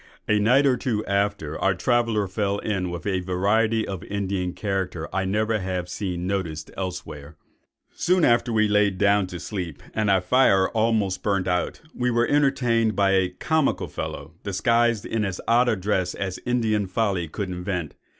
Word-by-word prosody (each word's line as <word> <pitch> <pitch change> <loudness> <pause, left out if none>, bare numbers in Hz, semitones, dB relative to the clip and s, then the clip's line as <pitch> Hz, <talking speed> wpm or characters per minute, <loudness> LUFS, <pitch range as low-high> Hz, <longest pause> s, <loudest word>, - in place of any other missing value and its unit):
A 105 -1 +3
night 125 +7 +4
or 130 -2 +3
two 115 -3 -2
after, 100 -6 -1
our 95 -1 +2
traveller 115 0 +1
fell 100 +1 -1
in 100 -4 -2
with 85 -2 -6
a 95 -2 0
variety 105 +5 +1
of 95 -2 -5
Indian 95 -2 -2
character 95 -5 -3
I 95 0 0
never 110 +3 0
have 90 -2 -3
seen 90 -3 -3
noticed 85 -5 -3
elsewhere:— 85 -5 -6 0.6
"Soon 180 -1 +2
after 120 0 +3
we 110 -1 +3
were 105 - 0
laid 105 -2 +3
down 100 -1 +3
to 90 -1 -7
sleep, 85 -9 -5
and 110 -1 0
our 95 -1 +4
fire 95 -1 +4
almost 110 -5 0
burnt 100 -3 0
out, 90 -1 -1
we 125 0 0
were 120 0 +2
entertained 120 -6 +2
by 100 -1 +3
a 95 -1 +3
comical 155 - 0
fellow, 75 +3 -6
disguised 115 +3 +1
in 110 -1 -1
as 95 -3 -3
odd 120 +2 +4
a 110 - +2
dress 95 -2 -1
as 95 -2 -4
Indian 110 -5 +1
folly 95 -3 0
could 100 +4 -4
invent. 90 -3 -3
100 Hz, 175 wpm, -24 LUFS, 90-110 Hz, 0.6 s, night